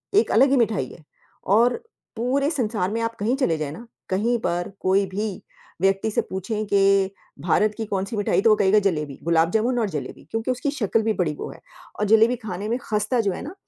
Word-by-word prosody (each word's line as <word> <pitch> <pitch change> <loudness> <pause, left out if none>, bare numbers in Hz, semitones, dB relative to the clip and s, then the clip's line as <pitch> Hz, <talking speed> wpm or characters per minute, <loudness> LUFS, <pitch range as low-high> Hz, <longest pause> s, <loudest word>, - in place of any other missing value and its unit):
एक 425 - +4
अलग 265 +4 +5
ही, 275 - +4
मिठाई 220 -4 +1
है। 165 - -14 0.4
और, 235 - +3 0.3
पूरे 265 +5 0
संसार 220 - -1
में 230 - -1
आप 230 0 -1
कहीं 230 +6 +1
चले 170 - +1
जाएँ 150 -2 -3
ना, 230 +9 -10 0.2
कहीं 225 +6 +1
पर 175 -2 -2
कोई 195 +1 +2
भी 200 +1 -4 0.4
व्यक्ति 195 +3 +2
से - - +1
पूछें 210 +3 -4
कि, 195 -1 +3 0.3
भारत 210 +5 +2
की 225 - -3
कौन-सी 195 +2 -3
मिठाई 205 -1 +1
तो 225 - +4
वो 215 - +6
कहेगा 200 +1 +4
जलेबी, 150 -8 -1
गुलाब 165 0 +2
जामुन 235 +4 +1
और 220 -3 0
जलेबी। 150 -5 -6
क्योंकि 225 +3 -1
उसकी 255 +3 -2
शक्ल 225 -5 0
भी 220 0 +1
बड़ी 170 -7 0
वो - - -6
है - - -13 0.4
और 210 - +1
जलेबी 225 +3 +5
खाने 210 -4 -6
में 235 - +1
खस्ता 215 +3 0
जो 200 -3 0
है - - -5
ना, 300 - -7
210 Hz, 215 wpm, -23 LUFS, 190-230 Hz, 0.4 s, वो